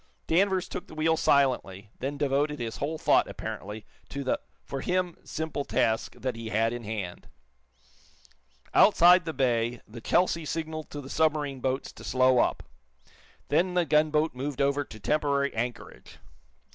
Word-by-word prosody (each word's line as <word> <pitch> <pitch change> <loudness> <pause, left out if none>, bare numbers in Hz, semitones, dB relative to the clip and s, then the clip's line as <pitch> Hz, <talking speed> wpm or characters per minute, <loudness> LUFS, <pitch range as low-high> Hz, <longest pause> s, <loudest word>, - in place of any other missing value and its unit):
Danvers 190 +2 +2
took - - -6
the - - -12
wheel 160 +1 +2
silently, 120 -10 +1
then 140 +3 -3
devoted 145 +1 +1
his 115 -2 -4
whole 155 +3 -2
thought, - - +3
apparently, 105 +1 -6 0.2
to 140 0 -4
the 130 - 0 0.2
for 135 -1 -5
him 180 -1 0
simple 160 -2 -3
task 110 -4 0
that 130 -2 -3
he 115 -1 -6
had 115 +2 +1
in 120 -1 -6
hand. 105 -5 -5 1.5
Outside 175 +1 +6
the 160 - -2
bay 120 -4 0
the 115 +2 -10
"Chelsea" 170 +4 +2
signaled 155 0 -4
to 145 - -6
the 135 - -10
submarine 150 -4 +1
boats 130 +1 -2
to - - -13
slow 130 -1 +3
up. - - +1 0.9
Then 180 +5 +2
the 175 -1 +3
gunboat 155 0 +2
moved 135 +2 -4
over 140 +1 +2
to 110 -5 -12
temporary 140 +3 +1
anchorage. 120 +2 -5
140 Hz, 155 wpm, -28 LUFS, 120-155 Hz, 1.5 s, Outside